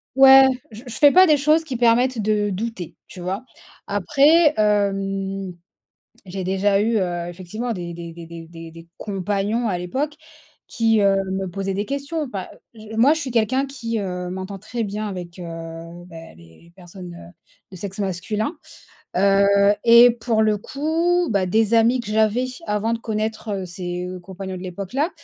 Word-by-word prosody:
Ouais, 270 0 +9 0.3
je 220 +3 -11
je 230 - -6
fais 290 -1 +7
pas 370 +1 +7
des 300 -2 +5
choses 305 +3 +3
qui 285 -5 -5
permettent 240 0 +3
de 210 0 +1
douter, 195 -3 -5
tu - - -12
vois? 190 +7 -4 0.4
Après, 290 - +4
hem, 195 -2 0 0.7
j'ai 190 +1 -5
déjà 195 +2 +1
eu, 225 +1 +1
heu, 175 -2 -2
effectivement 200 +7 -5
des 175 -2 -6
des 170 -1 -8
des 170 0 -10
des 165 0 -9
des 165 -1 -10
des 165 0 -13
compagnons 205 +3 -2
à 185 -4 -1
l'époque, 270 +12 -3 0.5
qui, 225 -2 +2
heu, 200 -1 +4 0.2
me 190 0 -2
posaient 195 +1 -3
des 205 +2 -2
questions. 280 +2 -3
Pas 195 -5 -6 0.2
je 220 0 -10
moi, 270 +6 +5
je 320 - -3
suis 265 - -4
quelqu'un 240 +4 +1
qui, 235 -5 -4
heu, 180 -2 -4
m'entend 190 +1 -6
très 230 +3 -4
bien 210 +1 -4
avec, 180 -2 -7
heu, - - -6 0.6
bah, 165 -2 -11
les 85 - -19
personnes, 180 -1 -11
heu, 170 0 -13 0.4
de - - -10
sexe 195 +3 -7
masculin, 205 - -2 0.6
heu 200 +1 +4
et 235 +1 +8
pour 230 -1 0
le 215 -1 +2
coup, 330 - 0
bah, 195 -3 +1
des 220 +4 +2
amis 235 +3 +4
que 235 - -9
j'avais 220 +3 +2 0.2
avant 210 +2 0
de 230 - -1
connaître, 220 0 -3
heu, 190 -1 -4
ses 180 0 -5
compagnons 190 +1 -7
de 180 - -8
l'époque 185 +1 -7
là 300 +6 +1
205 Hz, 175 wpm, -22 LUFS, 185-235 Hz, 0.7 s, Ouais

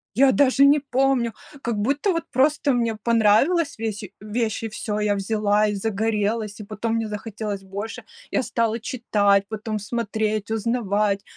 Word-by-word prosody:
Я 265 +1 +6
даже 275 0 +4
не 290 +1 +6
помню, 265 -3 +1 0.3
как 235 -4 -2
будто 280 - +1
вот 335 -2 -1
просто 285 +1 +2
мне 230 -2 0
понравилась 235 - +2
весь 220 -2 -3 0.2
вещь, 220 +1 -2
и 225 - -2
всё, 210 0 -3
я 210 -1 +1
взяла 210 +1 +1
и 205 - -1
загорелась, 215 +1 -1
и - - -6
потом 220 +2 -3
мне 225 -1 -1
захотелось 210 -1 -5
больше. 200 +4 -6 0.3
Я - - +1
стала 230 -1 0
читать, 205 -6 +1
потом 220 0 -4
смотреть, 215 0 -2
узнавать, 210 -3 0
220 Hz, 155 wpm, -23 LUFS, 210-245 Hz, 0.3 s, Я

